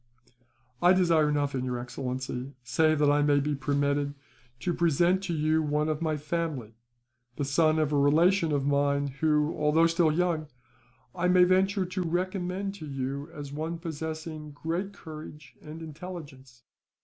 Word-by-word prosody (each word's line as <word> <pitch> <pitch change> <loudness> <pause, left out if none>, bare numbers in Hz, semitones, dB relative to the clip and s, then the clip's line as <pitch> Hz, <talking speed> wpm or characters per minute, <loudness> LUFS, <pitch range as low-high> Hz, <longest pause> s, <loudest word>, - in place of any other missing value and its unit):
"I 180 +1 +6
desire 165 -5 +3
nothing, 145 -3 0
your 125 -1 -2
excellency, 125 +1 -5
save 155 +6 +2
that 145 -1 +4
I 145 0 +3
may 145 -1 +4
be 145 +1 -1
permitted 140 +1 0 0.5
to 175 - 0
present 170 +3 +2
to 175 - -2
you 155 +1 +2
one 150 0 0
of 155 0 -2
my 155 -2 0
family: 150 -7 -3 0.6
the 145 - -2
son 155 +3 +3
of 155 -1 +1
a - - +3
relation 165 +4 +4
of 140 -2 0
mine 140 0 +1
who, 150 0 +2
although 150 +2 +3
still 165 -1 +3
young, 165 -1 0 0.7
I 180 -1 0
may 180 0 +6
venture 190 +2 +3
to 185 +1 -3
recommend 185 +2 -2
to 155 - -8
you 140 +2 -4
as 145 -3 -8
one 160 +3 -3
possessing 160 -1 -6
great 170 +7 -3
courage 155 -5 -11
and 160 +2 -9
intelligence. 145 -7 -10
155 Hz, 155 wpm, -28 LUFS, 145-170 Hz, 0.7 s, I